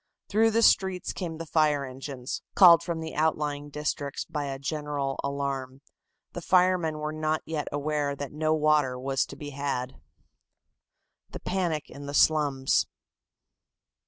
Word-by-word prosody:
Through 220 +2 +4
the 230 +1 +2
streets 190 -4 +3
came 165 -3 -5
the 165 - -6
fire 150 -3 +2
engines, 130 0 -6
called 175 -4 +8
from 170 -1 -3
the 160 0 -6
outlying 150 -2 -1
districts 145 -1 -3
by 150 -2 -4
a 135 -1 -4
general 145 -1 -3
alarm. 140 -1 -3 0.5
The 175 - -5
firemen 180 -3 +2
were 150 0 -3
not 155 0 -1 0.3
aware 145 0 -1
as - - -2
yet - - -10
that 140 -2 -5
no 155 +1 0
water 150 -4 +2
was 135 +1 -1
to - - -9
be 145 -1 -8
had. 135 -2 -3 1.3
THE - - -8
PANIC 175 -5 -2
IN 140 0 -9
THE 140 - -4
SLUMS. 145 -4 +3
150 Hz, 150 wpm, -27 LUFS, 140-160 Hz, 1.3 s, called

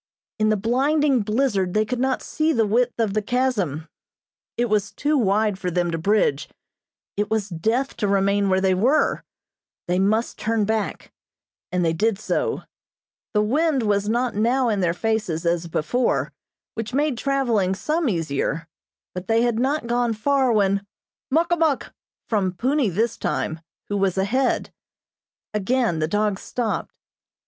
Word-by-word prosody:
In 215 0 +3
the 215 - +2
blinding 270 +5 +2
blizzard 210 -4 0
they 215 0 +3
could 245 +3 -3
not 260 0 0
see 315 +1 0
the 225 -5 +2
width 235 +4 +1
of 220 -4 +1
the 215 - +1
chasm. 205 - -1 0.7
It 240 - +2
was 210 -3 0
too 300 +1 0
wide 210 -4 +2
for 180 - -2
them 175 0 0
to 165 - -2
bridge; 165 -6 +1 0.7
it 205 +1 -1
was 215 -2 -1
death 225 +11 -1
to 205 - 0
remain 200 0 +2
where 190 0 +3
they 190 -1 +3
were 245 +11 +2 0.6
they 180 +1 +1
must 215 +4 +1
turn 220 -1 0
back, 220 0 -3 0.6
and 180 -1 +1
they 165 - +2
did 215 +5 +1
so. 450 - -1 0.7
The 210 - +4
wind 280 +3 +1
was 205 -1 +1
not 240 +2 0
now 240 +4 +2
in 210 -3 0
their 175 -2 +1
faces 185 -5 -1
as 170 0 0
before, 170 +10 0 0.4
which 225 +2 -4
made 290 -1 +1
traveling 235 -8 +1
some 310 - 0
easier, 165 -2 -2 0.5
but 180 0 -6
they 225 +1 +3
had 240 -2 +1
not 275 +2 0
gone 240 0 +1
far 265 +3 +2
when: 200 -2 +2 0.5
"Muk 325 +5 +2
a - - +5
muk!" 315 -5 0 0.3
from 195 -5 0
Punni 260 - +1
this 220 +6 0
time, 160 - -2 0.3
who 205 - -1
was 195 -2 +1
ahead. 245 +7 0 0.8
Again 215 -3 +1
the 155 - +1
dogs 205 +1 0
stopped. 240 -3 -3
215 Hz, 160 wpm, -23 LUFS, 195-250 Hz, 0.8 s, a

